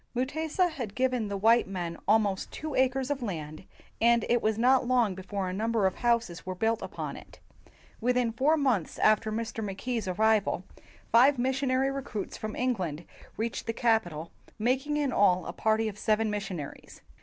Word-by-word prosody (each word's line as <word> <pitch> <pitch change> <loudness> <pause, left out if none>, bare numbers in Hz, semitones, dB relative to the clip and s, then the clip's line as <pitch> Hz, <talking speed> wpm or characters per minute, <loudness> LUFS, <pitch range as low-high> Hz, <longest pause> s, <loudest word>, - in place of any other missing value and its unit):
Mutesa 315 +8 0
had 240 -9 -6
given 255 -4 0
the 200 0 -3
white 225 +3 +4
men 175 -3 -4
almost 205 -3 +2
two 310 -1 -5
acres 260 +1 +1
of 280 -2 -2
land, 160 -7 -5 0.4
and 235 0 +4
it 240 -1 +3
was 215 0 +1
not 250 +2 +3
long 245 -5 +3
before 190 +1 -4
a 185 - -3
number 220 +1 0
of 190 - +2
houses 235 -10 0
were 185 0 -5
built 225 +4 0
upon - - -5
it. - - -13 0.6
Within 245 0 +1
four 275 +8 +2
months 250 - 0
after 215 0 +3
Mr. 225 0 -3
Mackay 210 +5 -3
's 205 - -6
ar 185 - -2
rival, 215 -3 +2 0.5
five 255 +5 +6
missionary 265 +1 +1
recruits 260 -7 -5
from 215 0 -5
England 180 - -2 0.3
reached 225 0 -3
the 230 - -1
capital, 180 -10 0 0.3
making 265 +6 0
in 285 -3 0
all 185 -3 +3
a 170 - -5
party 220 +2 +1
of 210 -1 -6
seven 215 0 +1
missionaries. 195 -8 -6
225 Hz, 175 wpm, -28 LUFS, 195-255 Hz, 0.6 s, five